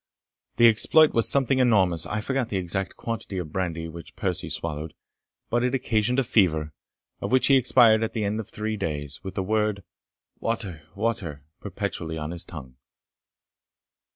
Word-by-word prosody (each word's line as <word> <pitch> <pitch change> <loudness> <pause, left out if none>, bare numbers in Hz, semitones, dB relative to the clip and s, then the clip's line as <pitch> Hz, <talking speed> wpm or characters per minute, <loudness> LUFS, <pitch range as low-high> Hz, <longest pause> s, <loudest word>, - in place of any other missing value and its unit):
The 120 - +7
exploit 150 +8 +5
was 115 - +5
something 135 -1 +2
enormous. 95 -10 +3
I 105 0 -2
forget 130 0 -1
the 100 - -1
exact 95 +1 -2
quantity 115 -4 -5
of 85 -4 -5
brandy 85 -3 -2
which 85 0 -11
Percie - - -2
swallowed, 75 -1 -4 0.6
but 120 +1 +2
it 125 +1 +1
occasioned 125 -1 0
a 135 - +3
fever, 80 -10 +1 0.5
of - - -4
which 130 0 +4
he 135 - +5
expired 120 -3 +5
at 110 - -3
the 110 - -2
end 105 +2 -1
of 110 -1 -6
three 110 0 -3
days, 75 -5 -4
with 95 - -7
the 95 - -1
word, 105 0 0 0.6
water, 100 -8 -3
water, 100 -9 -3 0.2
perpetually 90 -5 -4
on 75 0 -4
his 85 -1 -3
tongue. 65 -7 -10
100 Hz, 165 wpm, -25 LUFS, 85-115 Hz, 0.6 s, The